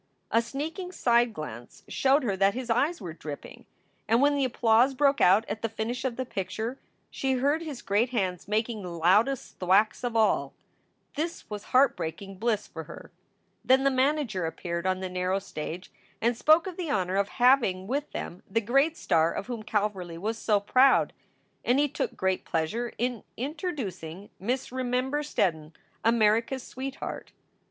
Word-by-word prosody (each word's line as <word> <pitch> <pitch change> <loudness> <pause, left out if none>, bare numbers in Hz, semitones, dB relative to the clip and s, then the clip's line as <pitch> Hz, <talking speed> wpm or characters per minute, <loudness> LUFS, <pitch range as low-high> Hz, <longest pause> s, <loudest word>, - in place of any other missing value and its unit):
A 230 - +4
sneaking 320 +9 -5
side 240 -7 +3
glance 120 - -8
showed 275 +2 +2
her 205 -6 0
that 195 +2 +3
his 250 -2 -3
eyes 290 +9 +1
were 175 -6 -6
dripping. 150 -3 -9 0.4
And 230 +1 +4
when 285 +2 +4
the 280 - +1
applause 245 +1 +3
broke 280 +1 +3
out 195 +5 +5
at 215 +2 -4
the 225 - -1
finish 225 +3 -3
of 250 -3 -1
the 260 - -3
picture, 220 +4 -4 0.3
she 265 -1 -1
heard 285 +5 +1
his 300 -6 -7
great 210 +5 +2
hands 190 -7 -2
making 220 +1 -1
the 180 - -6
loudest 190 +10 +1
thwacks 195 +6 +3
of 240 -2 -2
all. 220 -1 +2 0.6
This 325 +4 -3
was 210 -1 -5
heartbreaking 195 - +1
bliss 220 -2 0
for 160 -1 -8
her. - - -11 0.5
Then 265 +1 +4
the 275 - +4
manager 260 - +1
appeared 170 +2 -4
on 185 0 0
the 190 - -2
narrow 185 +1 -1
stage 180 -2 -6 0.3
and 235 +1 +1
spoke 310 +7 +5
of 370 -3 -6
the 350 -4 -3
honor 190 -6 0
of 200 0 +1
having 240 -8 +4
with 280 +7 -2
them 175 - -6
the 225 - +2
great 275 +9 +2
star 165 0 +2
of - - -4
whom 240 -3 -5
Calverly 205 -6 -2
was 220 +5 -3
so 210 -2 +2
proud, 255 +6 +4 0.5
and 245 - +3
he 295 +1 +3
took - - -3
great 190 0 0
pleasure 215 +10 -2
in 245 -1 -2
interdoocing 240 - -5
Miss 245 +7 -2
Remember 255 +3 -1
Steddon, 165 - -1 0.3
"America 230 +2 +3
s 260 - -8
sweet 265 +1 -6
heart." - - -7
230 Hz, 175 wpm, -28 LUFS, 190-265 Hz, 0.6 s, out